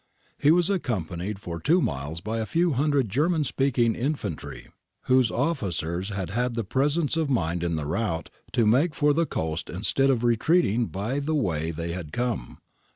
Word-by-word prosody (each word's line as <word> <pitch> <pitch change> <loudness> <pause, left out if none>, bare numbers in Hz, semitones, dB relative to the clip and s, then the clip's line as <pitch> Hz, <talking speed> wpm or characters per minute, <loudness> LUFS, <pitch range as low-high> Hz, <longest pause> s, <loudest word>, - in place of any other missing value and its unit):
He 145 - +4
was 175 +3 +4
accompanied 100 - -2
for 85 -4 -6
two 165 - +3
miles 75 - -3
by 110 +4 -3
a 110 - -2
few 170 +1 +2
hundred 140 -1 +2
German 155 - +1
speaking 125 -4 +1
infantry 140 +6 -4 0.3
whose 130 -3 +4
officers 95 - -1
had 95 -4 -4
had 120 +2 -1
the 115 - -1
presence 145 - +1
of 160 -3 0
mind 85 -9 0
in 85 -1 0
the 75 -2 -3
rout 85 +1 -2 0.2
to 120 -3 +3
make 140 +9 +3
for 145 0 +3
the 165 +2 +1
coast 80 - -3
instead 115 +9 +1
of 125 -3 +2
retreating 120 - +2
by 110 +9 -2
the 155 +2 -1
way 80 - 0
they 85 +1 -4
had 85 -4 -6
come. 120 - -3
120 Hz, 175 wpm, -26 LUFS, 90-145 Hz, 0.3 s, He